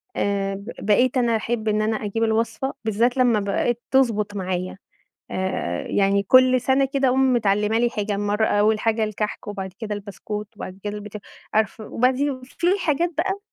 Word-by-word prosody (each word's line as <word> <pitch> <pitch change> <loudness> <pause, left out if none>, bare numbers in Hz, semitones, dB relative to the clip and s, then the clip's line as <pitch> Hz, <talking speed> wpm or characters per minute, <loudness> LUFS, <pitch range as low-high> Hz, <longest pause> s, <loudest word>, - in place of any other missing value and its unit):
آآ، 195 -1 -1
ب 200 +4 -8
بقيت 245 +5 +3
أنا 235 -2 +2
أحب 220 0 -2
إن 215 0 +2
أنا 215 0 0
أجيب 225 +3 -1
الوصفة 230 +4 0
بالذات 235 +4 +1
لمّا 240 -4 +4
بقِت 205 +4 0
تضبط 215 -6 +2
معايا 185 -1 -3 0.5
آآ، 185 - -2
يعني 200 0 +2
كُلّ 255 +3 +5
سنة 270 +2 +3
كده 270 -1 +2
اقوم 260 0 +3
متعلمة 210 -1 +2
لي 240 - +2
حاجة، 210 -3 -2
مَرّة 205 +1 +1
أوّل 215 +1 +2
حاجة 225 0 +1
الكحك 215 0 -3
وبعد 190 -2 -5
كده 215 -2 -3
البسكويت 205 +1 -6
وبعد 190 -1 -8
كده 205 0 -3
اليبت 210 0 -7 0.4
عارفة 215 0 0
وبعديه 260 +2 0
في 340 +6 -3
حاجات 335 +1 +1
بقى 385 +3 0
215 Hz, 170 wpm, -23 LUFS, 205-250 Hz, 0.5 s, كُلّ